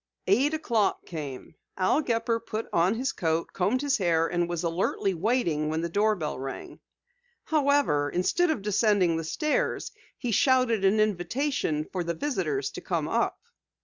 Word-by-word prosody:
Eight 265 Hz, +11 st, +3 dB
o'clock 230 Hz, -10 st, 0 dB
came. 145 Hz, -6 st, -7 dB, 0.2 s
Al 190 Hz, +10 st, +2 dB
Gepper 230 Hz, -3 st, 0 dB
put 220 Hz, 0 st, -5 dB
on 175 Hz, +5 st, +3 dB
his 260 Hz, +4 st, -1 dB
coat, 165 Hz, -1 st, -1 dB
combed 220 Hz, +9 st, 0 dB
his 285 Hz, -4 st, +1 dB
hair 165 Hz, -3 st, +2 dB
and 175 Hz, 0 st, -1 dB
was 175 Hz, 0 st, -3 dB
alertly 175 Hz, +3 st, 0 dB
waiting 170 Hz, -6 st, 0 dB
when 160 Hz, +1 st, -1 dB
the 170 Hz, -, -2 dB
doorbell 200 Hz, -8 st, 0 dB
rang. 135 Hz, 0 st, -7 dB, 0.6 s
However, 280 Hz, -, +2 dB
instead 330 Hz, -, +1 dB
of 270 Hz, -11 st, -1 dB
descending 205 Hz, -4 st, +2 dB
the 165 Hz, -, -2 dB
stairs 305 Hz, -, -1 dB, 0.3 s
he 245 Hz, -, -3 dB
shouted 255 Hz, -2 st, +3 dB
an 195 Hz, +3 st, +3 dB
invitation 210 Hz, -, 0 dB
for 180 Hz, +1 st, -4 dB
the 170 Hz, 0 st, -3 dB
visitors 295 Hz, -, -2 dB
to -, -, -8 dB
come -, -, -2 dB
up. -, -, 0 dB
200 Hz, 155 wpm, -27 LUFS, 170-250 Hz, 0.6 s, Eight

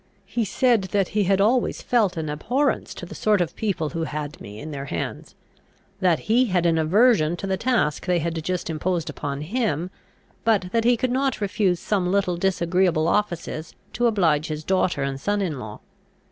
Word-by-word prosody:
He 235 Hz, -2 st, -1 dB
said 235 Hz, -2 st, +2 dB
that 195 Hz, -2 st, +2 dB
he 210 Hz, -2 st, +1 dB
had 195 Hz, +1 st, +2 dB
always 230 Hz, +5 st, +2 dB
felt 210 Hz, -7 st, +2 dB
an 160 Hz, -1 st, -2 dB
abhorrence 245 Hz, -, -1 dB
to -, -, -7 dB
the -, -, -10 dB
sort 210 Hz, -2 st, +2 dB
of 175 Hz, -3 st, -1 dB
people 190 Hz, -8 st, -1 dB
who 165 Hz, 0 st, -3 dB
had 150 Hz, 0 st, -5 dB
me 105 Hz, +1 st, -9 dB
in 155 Hz, +6 st, -7 dB
their 140 Hz, -1 st, -5 dB
hands; 85 Hz, -11 st, -5 dB, 0.6 s
that 180 Hz, -4 st, +2 dB
he 240 Hz, +4 st, +3 dB
had 180 Hz, -6 st, +1 dB
an 165 Hz, -1 st, +3 dB
aversion 175 Hz, -1 st, +3 dB
to 195 Hz, -, -5 dB
the 190 Hz, -1 st, 0 dB
task 220 Hz, -, 0 dB
they 180 Hz, -1 st, +3 dB
had 165 Hz, -1 st, -2 dB
just 180 Hz, +1 st, -2 dB
imposed 165 Hz, +1 st, -2 dB
upon 140 Hz, 0 st, -4 dB
him, 180 Hz, -, -1 dB, 0.5 s
but 200 Hz, -5 st, +1 dB
that 230 Hz, +1 st, +1 dB
he 245 Hz, 0 st, +4 dB
could 255 Hz, +1 st, -1 dB
not 265 Hz, +1 st, 0 dB
refuse 195 Hz, -3 st, +1 dB
some 185 Hz, -2 st, 0 dB
little 190 Hz, -3 st, +1 dB
disagreeable 175 Hz, -2 st, +1 dB
offices 170 Hz, -5 st, -2 dB, 0.2 s
to 240 Hz, +2 st, +2 dB
oblige 165 Hz, -9 st, +2 dB
his 155 Hz, 0 st, -4 dB
daughter 185 Hz, -5 st, +1 dB
and 135 Hz, 0 st, -3 dB
son 205 Hz, +4 st, 0 dB
in 165 Hz, -9 st, -2 dB
law. 110 Hz, -3 st, -8 dB
180 Hz, 190 wpm, -24 LUFS, 155-210 Hz, 0.6 s, he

